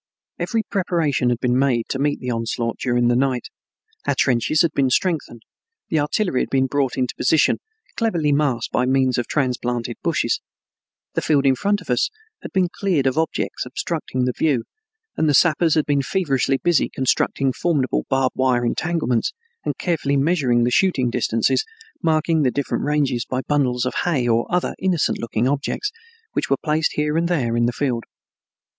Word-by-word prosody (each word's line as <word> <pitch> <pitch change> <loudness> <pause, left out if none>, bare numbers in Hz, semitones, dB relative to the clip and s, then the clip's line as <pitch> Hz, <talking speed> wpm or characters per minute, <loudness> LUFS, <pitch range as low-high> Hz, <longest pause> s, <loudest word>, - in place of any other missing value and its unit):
Every 225 -2 0
preparation 165 - 0
had 120 - +1
been 125 0 +1
made 125 -4 +2
to 135 - -2
meet 145 +1 0
the 125 - -3
onslaught 115 0 -2
during 120 -1 +1
the 120 - +3
night. 130 -1 0 0.6
Our - - +2
trenches 135 +6 +2
had 170 - +1
been 135 -3 +1
strengthened, 140 -6 -1 0.5
the 160 - +1
artillery 150 0 0
had - - -2
been 135 -1 +2
brought 135 -1 -1
into 125 -2 0
position, 150 +4 +3 0.4
cleverly 170 -10 +1
masked 140 -5 0
by 125 - +1
means 130 -1 +2
of 120 - -3
transplanted 125 -4 -1
bushes, - - 0 0.7
the - - 0
field 145 -3 +2
in 135 - +5
front 205 +8 0
of 170 - -6
us 125 - +2 0.3
had - - -8
been 185 -2 +2
cleared 180 -9 +1
of 130 0 +2
objects 160 +1 -1
obstructing 130 -1 -3
the 125 - 0
view, 140 -7 +1 0.5
and 155 - +2
the 145 - +4
sappers 165 0 +4
had 155 - +2
been 145 -1 +1
feverishly 135 -5 0
busy 175 +3 +2
constructing 130 0 0
formidable 145 -6 0
barbed 135 -1 +1
wire 125 -2 +2
entanglements 125 -3 0 0.3
and - - -3
carefully 150 -5 0
measuring 135 -6 +2
the 120 - +1
shooting 130 -6 +2
distances, 115 - +1 0.4
marking 160 0 +2
the 135 - +3
different 140 +2 -2
ranges 140 -5 +1
by 130 0 -1
bundles 130 -4 +1
of 125 - -2
hay 140 -9 +1
or 115 0 +2
other 180 0 0
innocent 185 -4 +1
looking 115 +1 -1
objects, 145 - -1 0.4
which - - -2
were 135 - +3
placed 155 0 +1
here 150 0 0
and 170 +1 +1
there 130 -10 0
in 120 0 +2
the - - +1
field. 120 -3 -2
135 Hz, 175 wpm, -21 LUFS, 125-160 Hz, 0.7 s, in